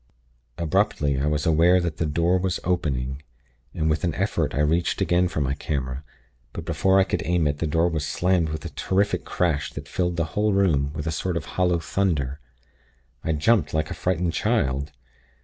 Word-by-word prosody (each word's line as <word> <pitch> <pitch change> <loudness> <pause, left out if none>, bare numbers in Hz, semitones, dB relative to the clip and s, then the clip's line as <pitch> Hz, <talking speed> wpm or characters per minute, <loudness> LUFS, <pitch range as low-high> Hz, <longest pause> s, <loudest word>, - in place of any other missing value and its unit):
"Abruptly, 75 -4 +1
I 70 - 0
was 75 -1 0
aware 85 +3 +5
that 85 -3 -3
the 85 - 0
door 85 +5 +2
was 95 -1 -1
opening, 70 -7 -1 0.5
and 80 -3 -1
with 75 -1 0
an 85 -4 0
effort - - -1
I 70 - +1
reached 80 +3 +1
again 90 +1 +2
for 80 - -3
my 70 -1 0
camera; 70 -3 -3 0.5
but 80 - -6
before 95 +4 +3
I - - +6
could - - -2
aim 85 -2 +1
it 75 0 0
the 80 - 0
door 80 +3 +2
was 80 -3 -1
slammed 90 -1 +1
with 80 -1 -5
a - - -3
terrific 100 +2 0
crash 80 -6 0
that - - -7
filled 90 -1 -1
the 85 - +1
whole 105 0 +2
room 80 -8 +2
with 75 -1 -5
a 80 - -1
sort 85 +3 -2
of - - -4
hollow 90 -2 +2
thunder. 80 -6 -1 0.8
I 80 - 0
jumped, 85 +5 +2
like 80 +2 -1
a - - -1
frightened 90 -2 -1
child. 75 - 0
80 Hz, 195 wpm, -24 LUFS, 75-90 Hz, 0.8 s, I